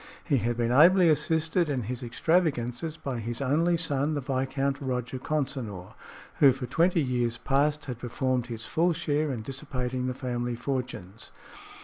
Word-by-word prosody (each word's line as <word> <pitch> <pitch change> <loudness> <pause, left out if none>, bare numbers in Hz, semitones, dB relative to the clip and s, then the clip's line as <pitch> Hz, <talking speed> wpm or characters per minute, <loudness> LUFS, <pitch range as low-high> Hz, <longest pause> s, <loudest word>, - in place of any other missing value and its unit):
He 145 -5 +2
had 120 0 -1
been 120 0 +1
ably 170 +6 +6
assisted 160 +2 +1
in 130 -4 -1
his 125 +4 -5
extravagances 145 +1 0
by 130 -6 -4
his 115 +1 -4
only 160 +6 +2
son, 150 -2 0
the - - 0
Viscount 135 +1 -1
Roger 125 -1 -3
Consinor, 130 -11 -3 0.5
who 140 -2 +8
for 130 0 -5
twenty 165 +5 +2
years 120 -2 0
past 145 +2 +1
had 125 -3 -6
performed 125 0 -1
his 115 -2 -5
full 170 +2 +2
share 150 -2 0
in 115 -4 -4
dissipating 130 -1 -3
the 125 - -2
family 120 -2 -3
fortunes. 125 -6 -5
135 Hz, 155 wpm, -28 LUFS, 120-150 Hz, 0.5 s, who